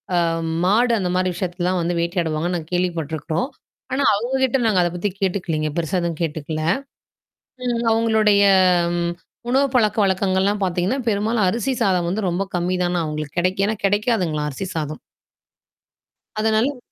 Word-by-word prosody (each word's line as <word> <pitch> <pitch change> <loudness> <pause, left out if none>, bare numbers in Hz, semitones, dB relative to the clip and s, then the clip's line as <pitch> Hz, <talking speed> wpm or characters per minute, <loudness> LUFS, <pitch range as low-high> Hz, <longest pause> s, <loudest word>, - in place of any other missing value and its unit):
அம் 165 -1 0 0.2
மாடு 235 +5 +3
அந்த 180 -2 -1
மாரி 185 0 +1
விஷயத்துலலாம் 180 0 -1
வந்து 175 +1 -1
வேட்டையாடுவாங்கன்னு 170 0 -1
நாங்க 160 -1 -8
கேள்விப்பட்டுருக்கறோம். 165 - -1 0.5
ஆனா 275 +1 +1
அவங்க 240 +6 -2
கிட்ட 260 0 +2
நாங்க 195 -5 +3
அத 175 - +1
பத்தி 190 +4 -1
கேட்டுக்கலீங்க. 170 -5 -1
பெருசா 170 +2 0
எதுவும் 170 -2 -3
கேட்டுக்கல. 155 0 -3 1.0
ம். 235 -1 0
அவங்களுடைய 220 -2 +3 0.5
ம் 170 0 0 0.4
உணவு 270 +2 +3
பழக்கவக்கங்கள்லாம் 200 -2 +2
பார்த்தீங்கன்னா, 185 +8 0
பெரும்பாலும் 215 0 +1
அரிசி 235 +7 0
சாதம் 180 -3 +2
வந்து 210 +4 -1
ரொம்ப 175 +3 -1
கம்மி 175 +1 0
தானாம் 175 -1 0
அவங்களுக்கு 150 +1 -5
கிடைக்கு 185 +2 +1
ஏன்னா 220 - 0
கெடைக்காதுங்களாம் 195 -8 +1
அரிசி 140 +8 -5
சாதம். 155 -1 -3 1.4
அதனால 220 +5 +1
185 Hz, 140 wpm, -21 LUFS, 170-215 Hz, 1.4 s, மாடு